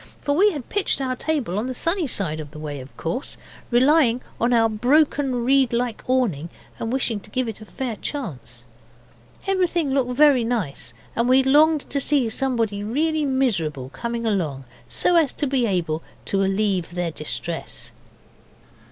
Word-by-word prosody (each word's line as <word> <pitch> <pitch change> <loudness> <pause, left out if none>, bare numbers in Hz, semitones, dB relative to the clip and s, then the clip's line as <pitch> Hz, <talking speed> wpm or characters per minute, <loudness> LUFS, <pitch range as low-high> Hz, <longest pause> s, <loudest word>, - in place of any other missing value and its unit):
For 285 - 0
we 400 +6 +5
had 285 -8 -6
pitched 405 -7 0
our 260 -1 -1
table 250 - -1
on 230 - -2
the 255 - -3
sunny 335 +3 +1
side 165 -10 -2
of 150 -2 -7
the 155 - -12
way, 150 -2 -5
of 130 +1 -12
course, 170 - -4 0.3
relying 255 0 +4 0.2
on 235 +2 +2
our 230 -2 +4
broken 255 +2 +2
reed 265 -1 +3
like 240 -1 -1
awning, 220 - +1 0.3
and 225 - -3
wishing 245 -4 0
to - - -17
give 255 -2 -1
it 220 -1 -6
a - - -9
fair 245 +1 -4
chance. 125 - -6 0.8
Everything 355 -6 +1
looked 260 -2 +1
very 280 -2 +5
nice, 180 - -3 0.2
and 235 +2 +1
we 260 +1 +6
longed 300 +3 +4
to 280 - 0
see 270 -5 +1
somebody 225 -4 -1
really 305 +7 0
miserable 190 - 0
come 235 - -4
along 190 - -1 0.2
so 350 - +2
as 315 -5 +3
to 295 - -2
be 260 -3 +1
able 165 -5 -1 0.2
to 195 0 +1
allieve 195 -3 0
their 175 -2 -1
distress. 160 +2 -5
240 Hz, 170 wpm, -23 LUFS, 190-275 Hz, 0.8 s, we